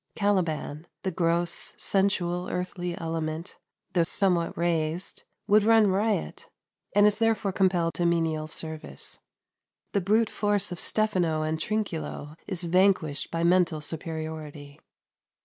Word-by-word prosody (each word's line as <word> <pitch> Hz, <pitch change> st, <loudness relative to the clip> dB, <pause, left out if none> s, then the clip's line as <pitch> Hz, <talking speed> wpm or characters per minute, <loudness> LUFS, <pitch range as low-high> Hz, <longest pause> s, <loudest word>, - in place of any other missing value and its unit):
Caliban, 170 Hz, -6 st, -1 dB, 0.2 s
the 190 Hz, -, -1 dB
gross, 170 Hz, 0 st, 0 dB
sensual, 180 Hz, -3 st, 0 dB
earthly 180 Hz, -1 st, -3 dB
element 165 Hz, +1 st, -4 dB, 0.3 s
though 175 Hz, -, +3 dB
somewhat 175 Hz, 0 st, +2 dB
raised 170 Hz, 0 st, -1 dB, 0.2 s
would 210 Hz, +1 st, +5 dB
run 220 Hz, -2 st, +5 dB
riot, 195 Hz, -, -1 dB, 0.5 s
and 205 Hz, 0 st, +6 dB
is 210 Hz, +1 st, +3 dB
therefore 225 Hz, -3 st, +1 dB
compelled 180 Hz, -3 st, +2 dB
to 175 Hz, -, -1 dB
menial 160 Hz, -2 st, 0 dB
service. 155 Hz, -, -6 dB, 0.7 s
The 200 Hz, -, +1 dB
brute 215 Hz, +4 st, +2 dB
force 205 Hz, -2 st, 0 dB
of 175 Hz, -, -5 dB
Stephano 180 Hz, -8 st, +1 dB
and 155 Hz, 0 st, -1 dB
Trinculo 165 Hz, -7 st, -3 dB
is 185 Hz, -3 st, -2 dB
vanquished 175 Hz, -4 st, +2 dB
by 165 Hz, 0 st, -2 dB
mental 175 Hz, -2 st, +3 dB
superiority. 155 Hz, -2 st, -6 dB
175 Hz, 120 wpm, -27 LUFS, 160-195 Hz, 0.7 s, and